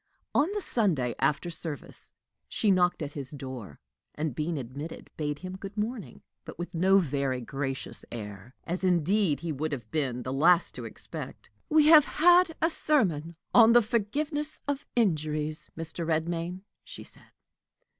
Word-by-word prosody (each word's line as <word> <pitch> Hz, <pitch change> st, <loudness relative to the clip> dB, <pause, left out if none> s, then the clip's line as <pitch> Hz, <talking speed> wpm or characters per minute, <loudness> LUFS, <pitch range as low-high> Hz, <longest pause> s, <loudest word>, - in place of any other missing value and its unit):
On 310 Hz, +7 st, +3 dB
the 415 Hz, -, -1 dB
Sunday, 165 Hz, -, +1 dB
after 155 Hz, +4 st, +1 dB
service, 160 Hz, -2 st, -7 dB, 0.4 s
she 210 Hz, -, +2 dB
knocked 180 Hz, -3 st, +2 dB
at 145 Hz, -, -5 dB
his 140 Hz, -3 st, -5 dB
door, 130 Hz, -, -8 dB, 0.4 s
and, 150 Hz, -2 st, -2 dB
being 155 Hz, +5 st, -2 dB
admitted, 140 Hz, +5 st, -7 dB
bade 150 Hz, -1 st, -2 dB
him 185 Hz, +3 st, -7 dB
good 195 Hz, +2 st, -8 dB
morning, 215 Hz, 0 st, -4 dB, 0.2 s
but -, -, -10 dB
with 175 Hz, +1 st, -6 dB
no 190 Hz, +3 st, +4 dB
very 140 Hz, -7 st, 0 dB
gracious 135 Hz, +2 st, -4 dB
air 105 Hz, +1 st, -8 dB
as, 180 Hz, +3 st, -4 dB
indeed, 180 Hz, -1 st, +2 dB
he 170 Hz, -1 st, -3 dB
would 155 Hz, +2 st, -2 dB
have 120 Hz, -6 st, -6 dB
been 130 Hz, -6 st, -1 dB
the 130 Hz, -, -3 dB
last 170 Hz, +6 st, +4 dB
to -, -, -7 dB
expect. -, -, -8 dB, 0.2 s
"We 310 Hz, -1 st, +5 dB
have 310 Hz, -3 st, +9 dB
had 350 Hz, +2 st, +5 dB
a 325 Hz, -, +4 dB
sermon 170 Hz, -, +1 dB, 0.2 s
on 230 Hz, -1 st, +8 dB
the 240 Hz, -, +7 dB
forgiveness 290 Hz, +8 st, -1 dB
of 285 Hz, 0 st, -2 dB
injuries, 155 Hz, -7 st, 0 dB
Mr. 165 Hz, +1 st, -5 dB
Redmain," 170 Hz, +3 st, -1 dB, 0.2 s
she -, -, -9 dB
said. -, -, -14 dB
165 Hz, 155 wpm, -28 LUFS, 145-210 Hz, 0.4 s, have